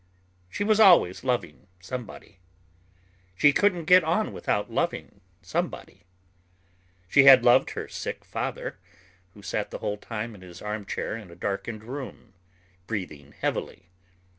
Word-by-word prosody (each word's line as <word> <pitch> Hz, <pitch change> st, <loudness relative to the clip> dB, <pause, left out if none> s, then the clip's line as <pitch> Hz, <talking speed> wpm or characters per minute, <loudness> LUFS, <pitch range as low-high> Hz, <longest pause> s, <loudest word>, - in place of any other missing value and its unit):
She 205 Hz, -, -3 dB
was 215 Hz, +1 st, +2 dB
always 175 Hz, -, +6 dB
loving 120 Hz, -, -2 dB
somebody. 105 Hz, -1 st, -8 dB, 1.0 s
She 145 Hz, +9 st, +5 dB
couldn't 180 Hz, -3 st, +2 dB
get 180 Hz, +2 st, +7 dB
on 170 Hz, +7 st, 0 dB
without 105 Hz, -, -2 dB
loving -, -, -3 dB, 0.2 s
somebody. -, -, -4 dB, 1.0 s
She 140 Hz, +7 st, +5 dB
had 130 Hz, -3 st, +9 dB
loved 120 Hz, -, +5 dB
her -, -, -4 dB
sick -, -, -6 dB
father, -, -, -5 dB, 0.6 s
who 100 Hz, -, -15 dB
sat 100 Hz, +2 st, -3 dB
the -, -, -6 dB
whole 105 Hz, -, -3 dB
time 110 Hz, +1 st, -6 dB
in 100 Hz, -, -14 dB
his 90 Hz, -1 st, -12 dB
armchair 105 Hz, 0 st, -4 dB
in 110 Hz, -5 st, -10 dB
a 85 Hz, -, -13 dB
darkened 100 Hz, +4 st, -4 dB
room, 125 Hz, -4 st, -8 dB, 0.5 s
breathing 80 Hz, -10 st, -6 dB
heavily. 90 Hz, -, -4 dB
110 Hz, 135 wpm, -26 LUFS, 95-140 Hz, 1.0 s, had